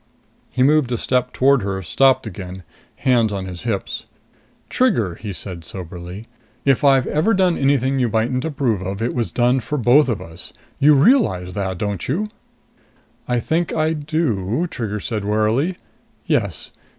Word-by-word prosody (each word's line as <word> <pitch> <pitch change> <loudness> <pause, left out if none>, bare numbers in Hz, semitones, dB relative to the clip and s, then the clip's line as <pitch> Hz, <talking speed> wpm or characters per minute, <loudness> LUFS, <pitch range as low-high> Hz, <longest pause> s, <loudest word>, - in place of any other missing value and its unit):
He 130 - +1
moved 145 -2 +3
a 120 - 0
step 125 +1 0
toward 135 0 +3
her, 95 -1 -3
stopped 130 +8 +3
again, 95 -2 -8 0.3
hands 120 -4 +2
on 95 -2 -3
his 90 -2 -7
hips. 100 -3 -3 0.6
"Trigger," 120 - +1
he 100 +4 -7
said 90 -2 -6
soberly, 90 +3 -8 0.4
"if 135 -1 +3
I've 135 -2 +5
ever 190 +9 +1
done 185 -3 +3
anything 135 -1 +1
you 125 -2 +2
mightn't 115 +4 0
approve 135 - -1
of, 95 +1 -4
it 120 - -1
was 115 -6 -1
done 125 +6 +2
for 130 +5 -3
both 130 +3 +4
of 110 -5 -1
us. 85 -2 -11 0.3
You 150 +1 +6
realize 135 - +3
that, 95 -2 -3
don't 100 -1 -3
you?" 200 +11 -1 1.0
"I 125 -1 +1
think 165 +7 -1
I 160 0 +1
do," 150 - -1
Trigger 105 -3 -3
said 105 0 -3
warily. 110 - +1 0.5
"Yes. - - -1
120 Hz, 160 wpm, -20 LUFS, 100-140 Hz, 1.0 s, You